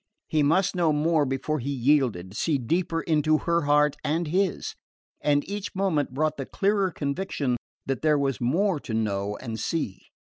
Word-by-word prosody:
He 155 - +1
must 180 +7 +2
know 170 -3 +3
more 150 0 +2
before 135 +3 -1
he 135 +3 -4
yielded, 125 -9 +1
see 150 +5 +1
deeper 165 +6 -1
into 155 -1 +2
her 170 -1 0
heart 150 0 +4
and 160 +3 0
his; 190 +3 0 0.5
and 145 -1 +2
each 205 0 -5
moment 180 -9 0
brought 155 +3 0
the 135 - -5
clearer 200 -1 +1
conviction 145 -4 -2 0.3
that 135 -1 -2
there 155 -1 +3
was 135 -5 -1
more 170 +8 +1
to 115 -5 -5
know 105 -2 -1
and 115 -3 -6
see. 110 - -2
150 Hz, 170 wpm, -26 LUFS, 135-170 Hz, 0.5 s, heart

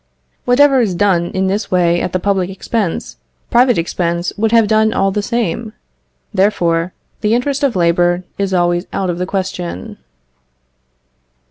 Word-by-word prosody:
Whatever 270 +1 +4
is 200 -6 0
done 180 -3 +2
in 190 +2 -2
this 200 +2 -1
way 175 -1 +2
at - - -2
the 185 - 0
public 190 -1 0
expense, 195 -1 -3 0.3
private 245 0 +4
expense 170 +1 -1
would 220 +1 0
have 230 -2 +4
done 220 0 +2
all 195 0 +1
the 210 - -1
same; 225 -1 -2 0.6
therefore, 175 -3 +1 0.3
the 215 +1 +1
interest 275 +3 -1
of 270 -6 +1
labour 175 0 +2 0.2
is 195 -1 -1
always 175 0 +1
out 190 -2 -1
of 175 - -5
the 180 - -2
question. 185 - -4
190 Hz, 150 wpm, -16 LUFS, 175-220 Hz, 0.6 s, Whatever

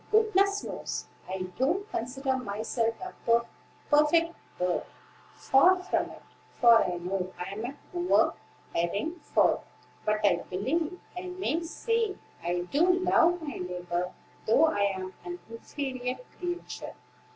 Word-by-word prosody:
Goodness 410 -2 +3
knows, - - -4 0.2
I 190 0 -2 0.2
don't 355 +10 +1
consider 265 +3 -1
myself 225 0 -1
a 370 0 -6 0.8
perfect 330 +3 +5 0.2
bird; 180 0 +1 0.5
far 360 +8 +5
from 365 0 -1
it; - - -12 0.4
for 235 -2 +8
I 180 -1 -2
know 185 +1 -2
I 180 +2 -5
am 215 +3 -4
a 270 +3 -5 0.2
poor, 355 0 +3 0.4
erring 200 - -1
fowl; - - +2 0.4
but 215 0 +1
I - - +5
believe 305 - -1 0.2
I 360 +1 -5
may 360 -2 -1
say 445 +5 0 0.3
I 175 +1 0
do 295 - +3
love 350 -1 +4
my 290 - -4
neighbor, 180 0 -3 0.4
though 255 +9 +6
I 205 -10 +2
am 185 0 -5
'an 175 0 -5
inferior 255 +1 -4 0.2
creature.'" 350 -1 -5
265 Hz, 130 wpm, -29 LUFS, -, 0.8 s, for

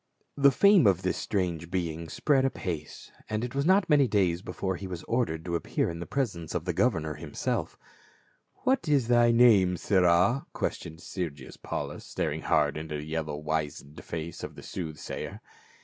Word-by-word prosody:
The 140 0 +6
fame 195 - +5
of 95 -1 +3
this 95 - 0
strange 85 -5 -2
being 85 -3 -3
spread 135 - +2
apace, 90 - -4 0.2
and 110 +1 -1
it 125 - -4
was 140 +3 0
not 190 0 +4
many 145 -4 +5
days 95 -5 +1
before 95 -1 -3
he 95 - -6
was 90 -2 -6
ordered 80 -10 -1
to 85 - -3
appear 70 0 -1
in 85 - -7
the 85 - -6
presence 100 - -2
of 85 - -2
the 90 - -1
governor 80 -7 +1
himself 75 0 -3 0.9
"What 255 -9 +1
is 140 -6 +2
thy 120 -1 +5
name, 110 -7 +5
sirrah?" 95 +7 +3
questioned 80 +2 -4
Sergius 75 -10 -6
Paukis, - - -5
staring - - -3
hard 75 -1 +2
into 75 -1 -4
the 75 - -6
yellow 80 -1 -3
wizened 75 -1 -4
face 85 0 -6
of - - -6
the - - -11
soothsayer. 80 -5 -6
90 Hz, 170 wpm, -28 LUFS, 80-120 Hz, 0.9 s, The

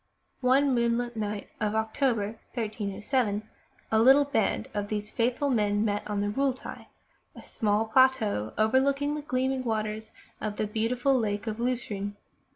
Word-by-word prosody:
One 265 +2 +4
moonlight 240 0 0
night 210 -1 -4
of 215 -1 -1
October, 220 -1 0 0.2
1307, 215 0 -1 0.4
a 220 - +4
little 270 +4 +7
band 235 -3 0
of 205 -1 -2
these 210 0 -3
faithful 250 +4 0
men 210 -2 +2
met 205 -1 0
on 205 -1 -1
the 205 - 0
Rlitli, 265 +3 -2 0.5
a - - -11
small 215 -1 0
plateau 220 - +3
over 220 +4 +4
looking 280 +2 +1
the 300 - -3
gleaming 260 -1 -1
waters 220 -1 -2 0.3
of 210 -1 -3
the 215 - -1
beautiful 235 +5 0
Lake 215 -5 0
of 220 0 -4
Lucerne. 220 -5 -2
220 Hz, 150 wpm, -28 LUFS, 210-255 Hz, 0.5 s, little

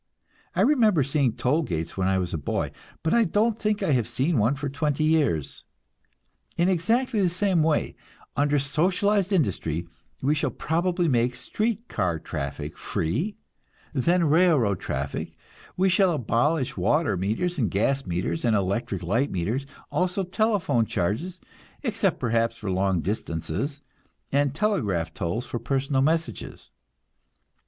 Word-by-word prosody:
I - - +2
remember 220 - +4
seeing 140 -3 +1
toll 125 +6 +1
gates 80 - -3
when 95 -1 0
I 95 0 +2
was 90 -2 -2
a - - 0
boy, 70 - -2 0.3
but 160 - +1
I 235 - +5
don't 215 +3 +1
think 210 -1 0
I 175 - +1
have 120 -5 +2
seen 130 +4 +1
one 115 +7 +2
for 145 +1 -4
twenty 145 +2 -1
years. 150 - +1 0.9
In 170 +1 +3
exactly 225 +6 +1
the 185 - +3
same 185 -1 +1
way, 155 -1 +1 0.4
under 145 +1 +2
socialized 185 +8 +1
industry, 90 - 0 0.3
we 140 +3 +2
shall 150 - 0
probably 175 +2 0
make 125 -2 +2
street 220 - -2
car 90 -5 -1
traffic - - -5
free, 145 - -2 0.6
and 135 - 0
then 175 +5 +3
railroad 150 - +3
traffic; 70 +1 -4 0.4
we 190 +1 +3
shall 185 -1 +4
abolish 130 +2 0
water 110 - +2
meters 115 - -1
and 110 -6 +1
gas 135 +9 +1
meters 90 - -2
and 115 -3 +3
electric 100 -1 -1
light 115 +11 +1
meters, 110 +10 -2 0.2
also 180 +2 0
telephone 180 - +1
charges, 115 - -2 0.4
except 215 - 0
perhaps 115 -1 +1
for 105 -4 -4
long 95 -1 +1
distances, 105 - -3 0.5
and 140 0 +1
telegraph 105 - 0
tolls 90 +9 -2
for 120 - -4
personal 135 +3 0
messages. 160 +3 -2
140 Hz, 145 wpm, -25 LUFS, 105-180 Hz, 0.9 s, I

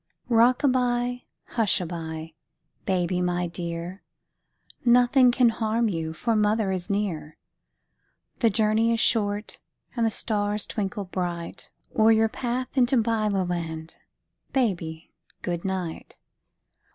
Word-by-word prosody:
Rock 240 +3 +4
a - - +5
by, 245 -1 0 0.2
hush 220 -4 +1
a 180 - -3
by, 160 -1 -6 0.5
baby, 180 -1 +1
my 180 0 0
dear, 170 +2 -5 0.8
Nothing 245 +1 +5
can 245 -1 +4
harm 225 0 0
you, 165 -4 -3
for 225 +8 -1
mother 210 -1 +2
is 185 -2 -3
near. 190 -7 -2 1.0
The 230 - +4
journey 220 +2 +2
is 230 - +1
short, 210 -2 +1 0.4
and 235 - 0
the 225 - +3
stars 210 -1 -1
twinkle 200 -1 -3
bright 175 -2 -4 0.3
O'er 220 0 +5
your 220 0 +4
path 250 +3 -3
into 260 0 +4
Byloland, 180 -8 -1 0.6
baby, 170 -10 -1 0.3
good 175 -1 -2
night. 185 -4 -4
210 Hz, 120 wpm, -26 LUFS, 175-230 Hz, 1.0 s, a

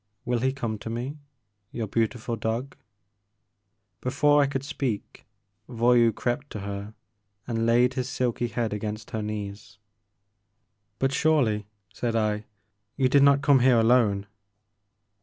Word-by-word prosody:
Will 120 0 0
he 130 +2 +1
come 115 -6 -4
to 110 - -7
me, 125 +6 -4 0.5
your 115 - -3
beautiful 115 +2 -1
dog? 115 +5 -3 0.6
*' 100 0 -51
Before 145 +3 +3
I 140 - +3
could 135 -1 -3
speak, 135 -6 -4 0.4
Voyou 120 -1 +4
crept 125 +6 -3
to 105 - -5
her 100 +2 -6 0.5
and 115 -1 -1
laid 120 +2 +4
his 130 -1 -3
silky 120 -2 -1
head 115 -2 -2
against 105 +1 -5
her 110 - -2
knees. 100 -2 -6 1.2
But 135 0 0
surely," 125 -11 +2 0.3
said 115 +3 -2
I, 105 -1 0 0.5
you 130 -2 +3
did 140 +2 +5
not 140 0 +5
come 140 -2 +5
here 125 -1 +5
alone." 110 -4 +3
115 Hz, 140 wpm, -26 LUFS, 110-130 Hz, 1.2 s, did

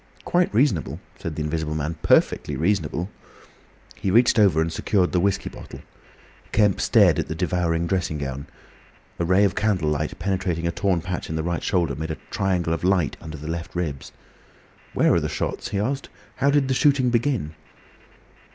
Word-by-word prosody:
"Quite 175 0 +2
reasonable," 110 - +1 0.2
said 80 - -5
the 75 - -2
Invisible 75 0 -2
Man. 80 +2 -2
"Perfectly - - +2
reasonable." 85 0 -1 0.8
He 95 - -2
reached 115 +3 +4
over 95 -7 +4
and 80 0 0
secured 90 +1 +1
the 90 - +2
whiskey 100 +2 0
bottle. - - -9 0.7
Kemp 105 -3 +3
stared - - +4
at - - -2
the 80 - -4
devouring 85 -1 0
dressing 85 -3 -1
gown. 70 -1 -5 0.7
A 85 - +1
ray 95 +4 +4
of 100 - +2
candle 95 -8 +1
light 75 0 -2
penetrating 90 -2 -1
a 85 - +1
torn 95 -2 0
patch 90 +1 -4
in 80 - -3
the 80 - -1
right 85 0 -2
shoulder, 90 -5 0
made 80 +1 -5
a 80 - -3
triangle 90 -4 0
of 85 - -4
light 90 -5 +2
under 80 -1 -8
the 75 +1 -8
left 85 +1 -5
ribs. 75 -6 -3 0.8
"What - - +3
were - - +4
the - - -3
shots?" - - -3
he 100 - -2
asked. 135 +7 -2 0.3
"How 135 +2 +2
did 140 -1 +3
the 130 - +1
shooting 130 -2 +3
begin?" 120 - 0
90 Hz, 180 wpm, -23 LUFS, 80-100 Hz, 0.8 s, reached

